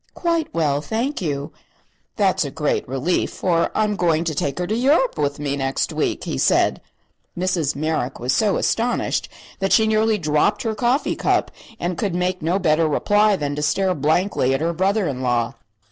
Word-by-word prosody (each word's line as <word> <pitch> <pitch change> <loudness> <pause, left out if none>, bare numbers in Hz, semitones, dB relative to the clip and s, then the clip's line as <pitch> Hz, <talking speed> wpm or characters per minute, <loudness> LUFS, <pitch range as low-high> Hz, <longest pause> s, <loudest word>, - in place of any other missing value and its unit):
"Quite 335 -2 -1
well, 145 -3 0
thank 235 - -2
you." 145 -4 -3 0.6
"That's - - +2
a - - -4
great - - -1
relief, 135 +8 0
for 170 -2 0
I'm 210 -1 +1
going 170 -3 +1
to 165 -2 -2
take 140 0 -2
her 180 - -1
to 210 +5 -1
Europe 290 - +2
with 145 -1 -1
me 145 -1 -2
next 135 -1 -1
week," - - -1
he 65 - -3
said. - - +2 0.6
Mrs. 175 -5 0
Merrick 150 -3 -2
was 125 +2 0
so 210 -3 +2
astonished 240 +2 0 0.3
that 195 0 -1
she 220 - +5
nearly 220 0 +2
dropped 155 +4 +1
her 225 - -1
coffee 245 +6 0
cup - - 0 0.3
and 175 0 -3
could 195 -5 -1
make 180 0 -1
no 170 +4 +1
better 160 -3 +2
reply 205 +7 +3
than 145 -4 -3
to 150 - -3
stare 185 +5 +1
blankly 155 -2 +1
at 135 - -3
her 170 +1 0
brother 190 +3 +1
in 130 -3 -3
law. 120 -2 0
175 Hz, 185 wpm, -21 LUFS, 145-210 Hz, 0.6 s, she